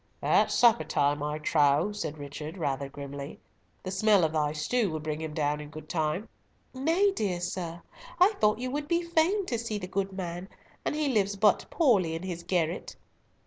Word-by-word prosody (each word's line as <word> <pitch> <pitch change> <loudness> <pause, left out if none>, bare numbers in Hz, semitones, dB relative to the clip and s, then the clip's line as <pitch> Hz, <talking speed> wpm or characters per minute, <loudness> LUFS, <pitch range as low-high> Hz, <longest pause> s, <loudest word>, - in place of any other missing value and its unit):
"At - - +3
supper 230 -9 +5
time, 145 -1 +1
I 150 +1 -2
trow," 150 +3 +3
said 155 -7 -4
Richard, 150 +3 -7
rather 140 -4 -2
grimly, 140 +1 -7 0.4
"the 185 - -4
smell 200 -1 +4
of 160 -1 +1
thy 150 -2 +1
stew 195 +9 0
will 155 -1 -3
bring 155 0 -4
him 155 -1 -5
down 150 -1 0
in 150 - -9
good 155 0 -10
time." 160 +6 -1 0.5
"Nay, 330 +10 +2
dear 195 - -1
sir, 175 -1 -4 0.4
I 365 +4 +7
thought 210 0 +4
you 255 +1 -4
would 290 +1 -3
be 340 +1 +1
fain 340 +4 +2
to 235 -9 -2
see 225 -2 -3
the 190 - -5
good 195 +1 -2
man, 180 0 -5 0.3
and - - -1
he 300 -2 0
lives 205 -5 +1
but 205 0 +3
poorly 200 - +3
in 165 - -5
his 175 -2 -4
garret." 170 -1 -1
180 Hz, 190 wpm, -28 LUFS, 155-220 Hz, 0.5 s, I